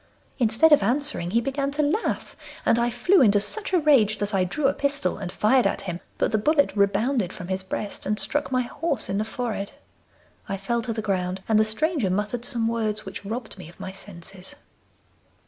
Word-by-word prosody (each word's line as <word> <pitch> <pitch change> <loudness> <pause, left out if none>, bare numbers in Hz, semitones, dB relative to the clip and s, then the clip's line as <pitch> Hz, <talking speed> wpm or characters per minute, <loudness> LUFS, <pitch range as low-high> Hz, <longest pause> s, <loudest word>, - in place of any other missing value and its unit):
Instead 240 +7 +4
of 295 - +7
answering 245 - 0
he 225 +5 +2
began 275 +3 -1
to 295 +2 0
laugh, 330 +10 -1 0.3
and 230 - +4
I 240 0 +2
flew 245 +11 +3
into 205 -4 +5
such 365 - -1
a 370 - +4
rage 265 - +4
that 205 +1 -2
I 190 -1 +3
drew 275 +11 -2
a - - +4
pistol 280 -10 -1
and 190 -3 -5
fired 245 +7 +3
at - - -2
him; 180 -3 -5 0.2
but - - +1
the 215 - +2
bullet 285 +3 +2
rebounded 200 +1 +1
from 180 - -8
his 190 0 -1
breast 195 +2 -5
and 210 +1 0
struck 280 +10 -1
my 255 -1 +2
horse 285 +2 -2
in 195 +1 0
the - - +1
forehead. 220 -3 -4 0.8
I 195 - -2
fell 235 +5 -1
to 230 - -3
the 220 -1 -4
ground, 185 -2 -2
and 220 -1 +4
the 215 - +4
stranger 255 - +1
muttered 210 +5 -2
some 235 -4 +2
words, 220 -2 -1
which - - -7
robbed 220 0 -6
me 165 - -9
of 175 - -18
my 190 - -6
senses. 190 -1 -9
220 Hz, 210 wpm, -25 LUFS, 195-270 Hz, 0.8 s, of